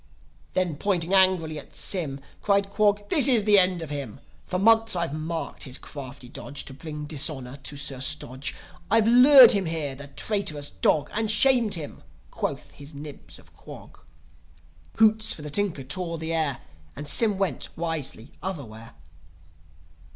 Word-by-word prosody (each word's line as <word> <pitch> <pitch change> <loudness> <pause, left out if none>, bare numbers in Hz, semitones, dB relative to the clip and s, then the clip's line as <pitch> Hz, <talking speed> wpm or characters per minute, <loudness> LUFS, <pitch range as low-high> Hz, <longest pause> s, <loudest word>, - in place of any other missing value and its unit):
Then 180 -5 -1
pointing 185 -1 -1
angrily 185 -5 +3
at - - -15
Sym, 145 -8 -2 0.2
Cried 200 -1 +1
Quog, 205 0 +1
"This 290 -5 +6
is 240 -6 +5
the 205 -1 +6
end 180 -2 +1
of 155 - -8
him! 140 -7 -6 0.3
For 180 - -2
months 225 +2 +4
I've 170 -4 -2
marked 160 +2 -4
his 130 -2 -4
crafty 135 -3 -9
dodge, 140 +2 -7
To 135 - -8
bring 150 +1 -7
dishonour 140 -3 -1
to 145 +1 -7
Sir 140 -2 -3
Stodge. 135 -1 -1 0.3
I've 225 0 +3
lured 250 +1 +9
him 200 -6 +2
here, 155 -4 -3
the 140 +1 -10
traitrous 150 -1 -3
dog, 150 - 0
And 220 0 -1
shamed 230 -1 +3
him!" 155 -4 -8 0.3
quoth - - -4
his 145 +1 -12
Nibs 145 0 -10
of - - -21
Quog. - - -13 1.0
Hoots 220 0 +3
for 150 - -10
the 150 - -7
Tinker 190 -6 -1
tore 170 +4 -4
the 160 +1 -4
air, 155 -5 -1 0.3
As 145 +1 -3
Sym 215 -4 +3
went, 190 -9 -2
wisely, 155 -7 -4
otherwhere. 120 - -7
165 Hz, 160 wpm, -25 LUFS, 145-200 Hz, 1.0 s, lured